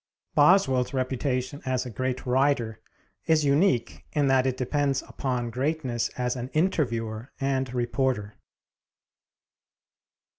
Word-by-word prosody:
Boswell's 145 -6 +4
reputation 130 +1 -1
as 130 0 -1
a 125 - -6
great 130 +3 -3
writer 125 -3 +1 0.5
is 155 -2 +3
unique 140 -5 +2
in 145 -2 +2
that 130 0 +3
it 130 -1 -1
depends 135 +1 0
upon 125 -3 -3
greatness 130 -2 -1
as 125 0 -1
an 125 0 -5
interviewer 120 - 0
and 135 -2 0
reporter. 120 -3 -1
130 Hz, 110 wpm, -26 LUFS, 125-140 Hz, 0.5 s, Boswell's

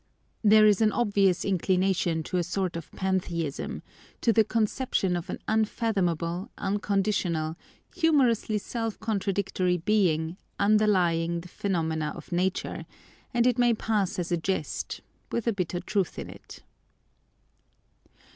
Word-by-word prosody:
“There 215 0 +7
is 210 -1 +4
an 215 -1 +4
obvious 200 -6 +2
inclination 185 -3 +1
to 180 - -2
a 175 - +1
sort 180 0 -2
of 165 -2 -7
Pantheism, 175 -6 -2 0.4
to 230 - +3
the 220 - +5
conception 215 -3 0
of 175 -1 -4
an - - -3
unfathomable, 195 -4 0
unconditional, 195 -5 0 0.4
humorously 265 - +3
self 225 +1 -4
contradictory 195 -4 0
Being, 170 -3 +1 0.2
underlying 180 -5 +2
the 180 - -12
phenomena 160 -6 -1
of - - -11
Nature; 180 +2 -1 0.4
and 240 -1 +2
it 250 -1 +2
may 240 -1 +4
pass 215 -4 0
as 180 -1 -3
a 175 - +2
jest, 190 +3 -3 0.3
with 235 - -1
a 230 - +2
bitter 180 -2 -2
truth 190 0 -1
in - - -6
it. - - -13
195 Hz, 125 wpm, -27 LUFS, 175-215 Hz, 0.4 s, There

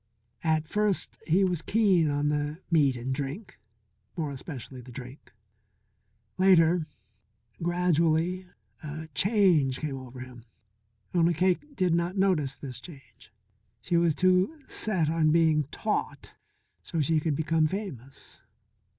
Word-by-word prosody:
At 155 -1 +1
first 210 +1 0
he 180 +4 +3
was 180 -4 0
keen 190 -8 +3
on 145 +1 0
the 150 +1 -2
meat 145 -5 +4
and 125 +2 -3
drink 145 - -6 0.6
more 155 -4 -2
especially 130 -2 -8
the 125 +1 -13
drink. 125 +2 -10 1.1
Later, 175 -3 +4 0.7
gradually, 175 +1 +1 0.3
a 155 +1 -7
change 175 - +3
came 140 -4 -4
over 130 0 -10
him. 125 -2 -11 0.7
Only 170 -1 +3
Cake 185 - 0
did 180 -6 +1
not 170 +3 0
notice 165 -8 +1
this 130 -3 -8
change. 135 - -15 0.5
She 175 - -1
was 170 -2 +3
too 185 - +2
set 185 -8 0
on 160 0 +2
being 160 -2 +3
taught 140 - -3 0.5
so 165 - -4
she 155 +2 +2
could 155 -1 -1
become 160 +1 +1
famous. 150 - -7
160 Hz, 125 wpm, -28 LUFS, 145-180 Hz, 1.1 s, meat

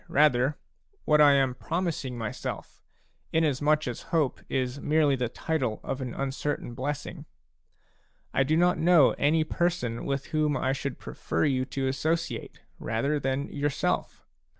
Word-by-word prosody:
rather, 145 -1 +3 0.5
what 150 -1 +5
I 145 -1 +7
am 135 -2 +3
promising 160 -4 -3
myself, 110 -3 -5 0.5
inasmuch 150 -1 +2
as 120 - -4
hope 160 -6 +1
is 130 +1 -2
merely 150 -2 +3
the 125 -3 -1
title 130 -6 -2
of 135 - -4
an 125 -2 -5
uncertain 135 -1 -3
blessing: 145 +4 -4 1.1
I - - +2
do 150 +4 +2
not 175 +1 +3
know 165 -4 +6
any 155 +3 +3
person 155 -8 -1
with 140 0 -2
whom 150 -2 +2
I 130 +1 0
should 140 -1 -4
prefer - - -2
you 130 -3 +1
to 135 0 -2
associate 160 +5 -2 0.2
rather 140 +7 -1
than 135 +1 -2
yourself. 145 -1 -2
140 Hz, 140 wpm, -27 LUFS, 130-155 Hz, 1.1 s, I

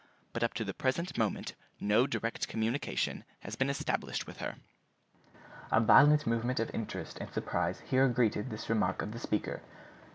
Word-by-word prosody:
But 115 - -3
up 115 - 0
to 110 - -1
the 100 -2 -4
present 150 - -1
moment 110 -3 -1 0.3
no 110 +6 +3
direct 115 -3 -2
communication 115 +5 -1 0.2
has - - -6
been 135 +1 +1
established 140 - -1
with - - -10
her." - - -4 1.2
A - - +5
violent 145 +6 +7
movement 115 +2 0
of 115 - -2
interest 115 - -5
and - - -6
surprise - - -1
here 130 +1 +3
greeted 115 -4 +1
this 110 - -6
remark 105 -5 +1
of 105 - -4
the 115 - -6
speaker. 105 - -2
115 Hz, 165 wpm, -32 LUFS, 110-130 Hz, 1.2 s, violent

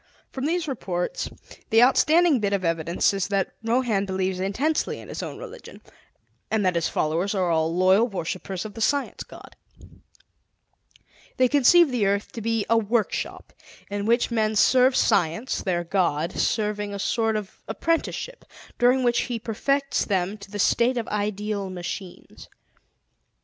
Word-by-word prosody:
From 265 +2 -3
these 340 0 -1
reports, 185 -10 -3 0.4
the 225 +2 +6
outstanding 310 +3 +4
bit 200 -2 -1
of 190 -2 -1
evidence 165 +3 +1
is 195 -2 -1
that 195 -2 -1
Rohan 225 -4 +1
believes 190 -1 -2
intensely 255 +12 -1
in - - -12
his - - -5
own - - -6
religion, - - -10 0.7
and 215 -2 0
that 185 - +2
his 165 -1 0
followers 170 +7 -1
are 180 -3 +1
all 160 0 +1
loyal 185 +6 +4
worshippers 185 -1 -5
of 210 - -7
the 225 - -8
Science 285 +4 0
God. - - -14 1.8
They 255 - +4
conceive 290 +4 +5
the 230 -5 +1
earth 200 +1 -1
to 230 - -7
be 225 -1 0
a 230 +1 +4
workshop 220 0 -2 0.4
in 205 +1 -2
which 235 +1 +2
men 220 -2 +1
serve 255 +4 +4
Science, 175 +10 +1
their 175 -3 -1
God, 170 -2 0
serving 210 -2 -1
a - - -4
sort 225 +2 0
of 210 -3 -6
apprenticeship 335 +9 -2 0.4
during 250 +2 +4
which 240 -1 +2
He 240 - -1
perfects 275 +5 -1
them 190 0 -1
to 200 0 -12
the 205 - -6
state 240 +5 +2
of 230 - -2
ideal 210 -1 -2
machines. 180 0 -8
210 Hz, 155 wpm, -24 LUFS, 190-245 Hz, 1.8 s, the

